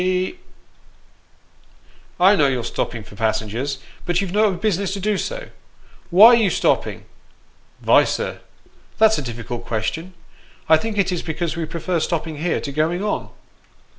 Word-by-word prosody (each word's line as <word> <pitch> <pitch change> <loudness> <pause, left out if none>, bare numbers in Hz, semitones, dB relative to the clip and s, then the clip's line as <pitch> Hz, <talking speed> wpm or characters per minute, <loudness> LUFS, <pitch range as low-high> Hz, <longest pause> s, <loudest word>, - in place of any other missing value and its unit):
Ty." 185 0 0 1.0
" - - -32
I 190 +3 +6
know 150 -7 +4
you're 130 -3 -1
stopping 115 -1 -3
for - - -15
passengers; 110 +5 -2 0.3
but 175 0 0
you've 195 -3 -2
no 210 +1 +3
business 195 0 -1
to 200 - -4
do 210 +2 0
so. - - -4 0.6
Why 195 +6 +9
are 240 - +7
you 220 -4 +3
stopping? - - 0 0.3
" - - -36
" - - -34
Vy, - - +5
sir, - - -3 0.6
that's 220 -3 +4
a - - -3
difficult 120 -1 -6
question. 160 +11 -3 0.5
I 160 - +6
think 220 +5 -4
it 195 -2 +2
is 180 - -2
because 165 +1 -3
we 165 -1 -2
perfer 170 +2 -2
stopping 160 -2 -2
here 170 +3 -1
to 140 - -5
going 160 +6 0
on." 210 - -2
175 Hz, 165 wpm, -21 LUFS, 145-200 Hz, 1.0 s, Why